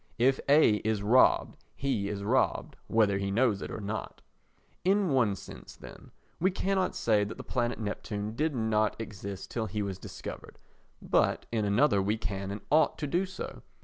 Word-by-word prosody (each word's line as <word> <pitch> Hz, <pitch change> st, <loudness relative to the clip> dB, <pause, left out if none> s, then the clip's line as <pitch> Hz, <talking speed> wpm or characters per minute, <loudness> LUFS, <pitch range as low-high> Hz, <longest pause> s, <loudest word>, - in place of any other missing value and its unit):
If 130 Hz, +3 st, +3 dB
A 140 Hz, -7 st, +6 dB
is 105 Hz, -1 st, -1 dB
robbed, 120 Hz, +5 st, +4 dB, 0.2 s
he 120 Hz, -8 st, -1 dB
is 100 Hz, -1 st, -4 dB
robbed, 125 Hz, +6 st, +1 dB
whether 105 Hz, -3 st, +3 dB
he 100 Hz, 0 st, -2 dB
knows 105 Hz, -1 st, +2 dB
it -, -, -5 dB
or -, -, -5 dB
not. 105 Hz, +1 st, -5 dB, 0.6 s
In 195 Hz, +1 st, +3 dB
one 120 Hz, -7 st, +3 dB
sense, 100 Hz, +1 st, -11 dB
then, -, -, -13 dB, 0.3 s
we 185 Hz, -, +3 dB
cannot 190 Hz, 0 st, 0 dB
say 105 Hz, -3 st, +2 dB
that 105 Hz, -, -6 dB
the -, -, -7 dB
planet 120 Hz, -2 st, -1 dB
Neptune 105 Hz, 0 st, -4 dB
did 155 Hz, +3 st, 0 dB
not 110 Hz, -2 st, +1 dB
exist 100 Hz, -3 st, -7 dB
till 115 Hz, -2 st, -2 dB
he 105 Hz, -1 st, -2 dB
was 95 Hz, -2 st, -4 dB
discovered, -, -, -8 dB, 0.5 s
but -, -, +1 dB
in 110 Hz, -2 st, 0 dB
another 100 Hz, +1 st, +3 dB
we 105 Hz, +3 st, 0 dB
can 100 Hz, -3 st, -4 dB
and 100 Hz, +1 st, -5 dB
ought 155 Hz, +2 st, +4 dB
to 155 Hz, -, -3 dB
do 175 Hz, +7 st, 0 dB
so. 190 Hz, -, -7 dB
110 Hz, 180 wpm, -29 LUFS, 100-135 Hz, 0.6 s, A